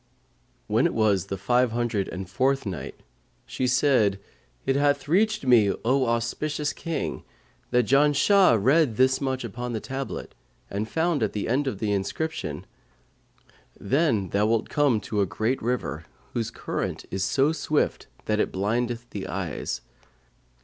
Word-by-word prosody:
When - - +2
it - - -5
was 105 -4 +2
the 95 - -3
Five 120 +4 +2
Hundred 120 -4 -1
and 95 0 -6
Fourth 130 +8 +1
Night, 75 -9 -5 0.5
She 130 - -2
said, 125 -6 +3 0.5
It 135 - +1
hath 145 0 +1
reached 210 +2 +2
me, 115 -6 +5
O 130 +1 +2
auspicious 145 +6 -1
King, 165 -1 -4 0.5
that 125 -1 +3
Janshah 145 - +5
read 135 +2 +3
this 130 +3 +3
much 130 -2 -1
upon 120 +2 -5
the 110 - -1
tablet 135 +3 -5 0.4
and 105 +3 -3
found, 165 -3 0
at 110 - 0
the 105 - -2
end 135 +4 +1
of 110 - -2
the 105 +1 -1
inscription, 100 - -3 1.1
"'Then 115 - +1
thou 105 +2 +2
wilt 115 0 0
come 140 -7 +2
to 105 0 -1
a 100 - +1
great 110 +8 -1
river, 115 -9 -2 0.3
whose 115 -2 -1
current - - -4
is 95 -1 -1
so 135 - +2
swift 155 -2 -1 0.2
that 105 0 0
it - - +1
blindeth 120 +4 -1
the 100 -2 -5
eyes. 85 -8 -4
120 Hz, 150 wpm, -25 LUFS, 105-140 Hz, 1.1 s, me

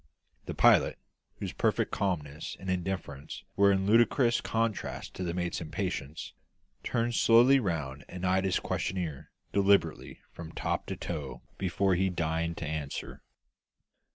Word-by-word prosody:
The - - -4
pilot, - - +5 0.4
whose - - -5
perfect - - +1
calmness 80 -6 -2
and 95 0 -3
indifference 90 -6 -4
were 100 0 +5
in 95 -1 +1
ludicrous 120 +3 +4
contrast 115 -2 -2
to 95 - -5
the 85 - -1
mate's 90 -1 -2
impatience, 75 -2 -4 0.5
turned 120 0 -1
slowly 120 +4 +6
round 75 - -3
and 90 0 -5
eyed 95 +1 +2
his 95 - +1
questioner 80 -6 -3 0.2
deliberately 100 -5 +2
from 85 -2 -9
top - - -2
to - - -4
toe 70 -7 -5 0.2
before 95 +1 +1
he 95 +2 +2
deigned 85 -1 -1
to 80 - -4
answer. 75 -2 -5
90 Hz, 135 wpm, -30 LUFS, 80-100 Hz, 0.5 s, slowly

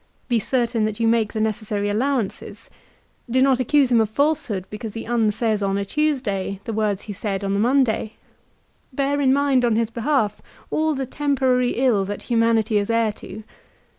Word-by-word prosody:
Be 240 -2 +2
certain 235 -1 0
that 215 0 -3
you 230 - +2
make 225 -2 +1
the 220 - -2
necessary 215 -1 -1
allowances. 230 +1 -2 0.6
Do 255 +2 +2
not 265 -1 +4
accuse 265 +1 +2
him 235 -2 +5
of 220 - 0
falsehood 280 - 0
because 215 0 -7
he 225 - -5
unsays 220 -2 0
on 195 0 0
a 200 - -2
Tuesday 210 -9 -1
the 225 - -5
words 210 -2 -1
he 210 - -6
said 195 0 -3
on 195 0 -1
the 200 - 0
Monday. 235 -2 +1 0.8
Bear 280 +2 0
in 265 -2 +3
mind 275 -2 +2
on 235 -2 +2
his 230 0 0
behalf 230 -3 0 0.3
all 315 -1 +1
the 265 0 -2
temporary 260 -3 +1
ill 240 -6 +2
that 205 +1 -5
humanity 230 -2 +2
is 205 - -3
heir 230 -1 +2
to. 215 +1 -10
230 Hz, 180 wpm, -22 LUFS, 210-260 Hz, 0.8 s, him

